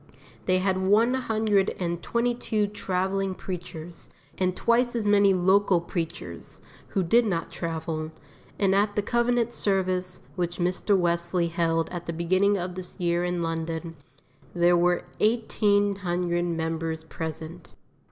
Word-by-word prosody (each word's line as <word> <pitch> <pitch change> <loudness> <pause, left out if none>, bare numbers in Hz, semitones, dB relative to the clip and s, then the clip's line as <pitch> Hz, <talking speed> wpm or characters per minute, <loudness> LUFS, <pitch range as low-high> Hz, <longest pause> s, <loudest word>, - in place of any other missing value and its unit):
They 185 0 +4
had 190 0 +1
one 215 +6 +4
hundred 220 -6 +1
and 170 -1 -2
twenty 235 +4 0
two 220 -3 0
travelling 195 -1 -1
preachers, 175 -3 -7 0.3
and 185 -1 0
twice 240 +1 +2
as 225 -3 -1
many 200 -1 +5
local 190 0 +4
preachers, 170 -1 -6 0.3
who 195 - 0
did 230 +8 +4
not 175 -7 -2
travel, 160 -1 -3 0.5
and 195 -1 +2
at 205 +1 +2
the 210 - +1
covenant 240 +1 +1
service 185 -3 0
which 175 -1 -2
Mr. 180 +3 +1
Wesley 170 0 0
held 165 -1 +1
at 175 -1 -6
the 170 - -2
beginning 185 +5 +2
of 180 0 -3
this 185 +1 -7
year 175 0 +1
in 175 -1 -1
London, 165 0 -3 0.6
there 175 0 +4
were 175 0 +2 0.2
eighteen 205 -3 +2
hundred 175 -2 -1
members 160 -1 -2
present. 160 +1 -7
180 Hz, 140 wpm, -26 LUFS, 170-205 Hz, 0.6 s, many